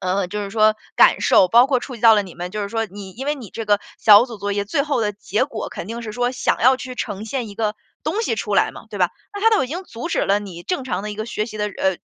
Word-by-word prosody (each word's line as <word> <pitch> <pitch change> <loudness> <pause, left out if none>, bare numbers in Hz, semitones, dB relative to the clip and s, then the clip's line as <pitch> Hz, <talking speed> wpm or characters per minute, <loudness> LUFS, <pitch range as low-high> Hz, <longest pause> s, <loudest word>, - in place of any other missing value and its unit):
呃， 185 +1 0
就 210 +2 -4
是 200 - -7
说 215 0 +4 0.2
感 - - +6
受， 190 - +5
包 240 +6 +6
括 260 - +3
触 255 - -7
及 220 - -16
到 225 -1 +8
了 205 - +2
你 180 - -11
们， 175 +1 -6
就 210 +2 -4
是 200 - -3
说 225 0 -2
你 195 -1 -10
因 265 +6 -7
为 295 - +1
你 235 -7 -10
这 225 - -5
个 205 -1 +2 0.2
小 210 +1 +8
组 235 -4 -8
作 205 0 -3
业， 200 0 -1
最 280 +8 0
后 285 -4 -1
的 210 -2 0
结 210 +3 -1
果 235 -6 -6
肯 170 - -7
定 230 +2 -6
是 220 - -6
说， 245 +2 0
想 255 - 0
要 260 +2 +5
去 255 0 -7
呈 210 -3 -4
现 235 -1 -3
一 200 - -10
个 215 -1 -1 0.3
东 330 +8 -1
西 - - 0
出 - - -3
来 - - +3
嘛， - - -12
对 - - -6
吧。 - - +2 0.2
那 405 - -5
他 450 - +5
都 435 - +3
已 - - -5
经 345 +6 -4
阻 235 0 -7
止 - - 0
了 200 +1 +2
你 180 -4 -9
正 360 -7 -2
常 255 - -3
的 210 - -4
一 - - -5
个 215 +1 -4
学 215 -2 -3
习 215 - -8
的 210 0 -1
呃， 190 -2 -1
215 Hz, 335 characters per minute, -21 LUFS, 205-250 Hz, 0.3 s, 到